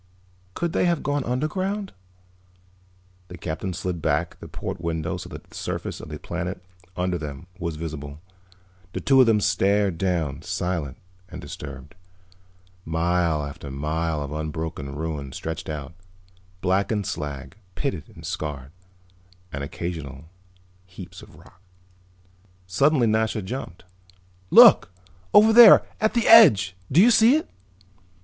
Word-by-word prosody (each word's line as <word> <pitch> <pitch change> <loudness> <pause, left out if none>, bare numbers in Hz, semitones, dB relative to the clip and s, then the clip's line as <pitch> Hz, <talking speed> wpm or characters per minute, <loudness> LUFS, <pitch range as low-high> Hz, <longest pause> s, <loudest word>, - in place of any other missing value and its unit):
"Could 170 -1 -2
they - - +1
have 170 -3 0
gone 145 -1 -1
underground?" 185 - -2 1.3
The 90 - -10
Captain 85 +3 -4
slid 90 -1 -4
back - - -1
the - - -10
port - - -6
window 80 -2 -3
so - - -9
that - - -10
the - - -18
surface - - -5
of - - -10
the 75 - -6
planet 90 +3 -6 0.3
under 90 -1 -1
them 75 +1 -7
was 85 -3 -3
visible. 75 -2 -7 0.7
The - - -3
two 135 -1 +4
of 125 - +5
them 110 -2 +4
stared 100 -3 +1
down, 85 -7 -1
silent 85 -7 -3 0.3
and - - -8
disturbed. 70 -2 -9 0.9
Mile 80 -2 0
after 70 0 -9
mile 75 +2 -2
of 70 - -7
unbroken 75 -2 -5
ruin 75 -3 -5
stretched 80 0 -6
out, 75 0 -6 0.7
blackened 100 +2 0
slag, 75 -1 -6 0.2
pitted 130 - -4
and - - -11
scarred, 70 -3 -5 0.8
and 70 +1 -4
occasional 75 -2 -6 0.6
heaps 90 0 -11
of - - -16
rock. 90 - -19 1.0
Suddenly 135 - +2
Nasha 110 -1 0
jumped. 105 -4 -7 0.7
"Look! 85 - +7 0.4
Over 215 +2 +6
there, 235 -2 +9
at 220 +2 0
the 235 - +1
edge. 110 - +7 0.2
Do 145 - +4
you 230 +6 +7
see 230 +4 +6
it?" 315 - -1
85 Hz, 135 wpm, -24 LUFS, 75-110 Hz, 1.3 s, there